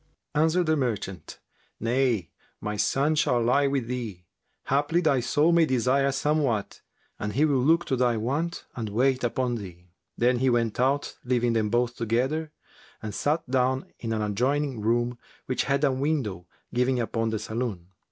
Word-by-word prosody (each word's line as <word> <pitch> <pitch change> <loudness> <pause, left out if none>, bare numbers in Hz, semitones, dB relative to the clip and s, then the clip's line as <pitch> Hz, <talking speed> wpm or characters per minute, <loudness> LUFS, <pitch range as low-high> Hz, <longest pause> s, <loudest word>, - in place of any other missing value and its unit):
Answered 160 +4 +2
the 160 0 +2
merchant, 110 - -3 0.4
"Nay, 115 -6 0 0.3
my 105 0 -3
son 135 +9 +1
shall 125 -5 +2
lie 125 +5 +3
with 135 -3 0
thee: 115 -7 -5 0.4
haply 145 +5 +2
thy 155 -6 +2
soul 145 +7 +2
may 170 -2 +4
desire 130 +2 +2
somewhat, 135 -6 0 0.4
and 105 0 -3
he 145 +7 +3
will 140 -4 +2
look 165 +6 +3
to 135 - 0
thy 120 -2 +2
want 145 +10 -2
and 115 -3 -4
wait 130 +4 +1
upon 120 0 0
thee." 90 -4 -10 0.3
Then 125 +1 +2
he 130 +1 +3
went 115 -2 0
out 135 +3 +1
leaving 120 -1 +1
them 110 -2 +1
both 120 +1 0
together, 130 +8 -1 0.5
and 105 -1 -4
sat 150 +1 0
down 130 +1 +1
in 115 - -4
an 110 -1 0
adjoining 130 +5 0
room 120 +2 0 0.3
which 130 - -1
had 140 +1 +1
a 140 - +4
window 130 - -2 0.3
giving 125 +1 +1
upon 115 -1 -1
the 110 - -1
saloon. 110 -5 -4
125 Hz, 165 wpm, -26 LUFS, 115-140 Hz, 0.5 s, may